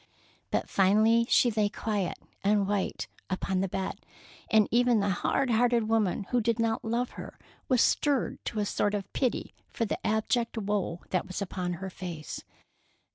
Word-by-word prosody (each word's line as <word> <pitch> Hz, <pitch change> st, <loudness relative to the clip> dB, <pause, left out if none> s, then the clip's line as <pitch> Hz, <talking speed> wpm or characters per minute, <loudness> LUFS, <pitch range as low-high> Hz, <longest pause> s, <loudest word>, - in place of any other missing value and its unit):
But -, -, 0 dB
finally 215 Hz, +4 st, +4 dB
she 240 Hz, -, +5 dB
lay 210 Hz, -1 st, +1 dB
quiet 205 Hz, -4 st, -2 dB, 0.3 s
and 200 Hz, 0 st, +3 dB
white 200 Hz, -1 st, -1 dB, 0.2 s
upon 185 Hz, 0 st, -1 dB
the 195 Hz, -, 0 dB
bed, 190 Hz, +1 st, -4 dB, 0.5 s
and 215 Hz, -2 st, +5 dB
even 240 Hz, -1 st, +4 dB
the 200 Hz, 0 st, +1 dB
hard 250 Hz, +7 st, 0 dB
hearted 235 Hz, -1 st, +3 dB
woman 220 Hz, -3 st, +1 dB
who 245 Hz, -1 st, +3 dB
did 230 Hz, 0 st, +1 dB
not 230 Hz, -1 st, 0 dB
love 235 Hz, +2 st, -1 dB
her -, -, -9 dB, 0.3 s
was 255 Hz, -3 st, +4 dB
stirred 285 Hz, -4 st, +1 dB
to -, -, -4 dB
a 205 Hz, -, +1 dB
sort 205 Hz, +1 st, 0 dB
of 200 Hz, -2 st, -5 dB
pity 255 Hz, -3 st, -1 dB, 0.2 s
for 230 Hz, -, -1 dB
the -, -, -4 dB
abject 225 Hz, +2 st, 0 dB
woe 200 Hz, -5 st, -1 dB
that 185 Hz, +1 st, 0 dB
was 185 Hz, -, -4 dB
upon 180 Hz, -2 st, -3 dB
her 190 Hz, +2 st, -6 dB
face. 170 Hz, -5 st, -6 dB
210 Hz, 170 wpm, -29 LUFS, 195-230 Hz, 0.5 s, she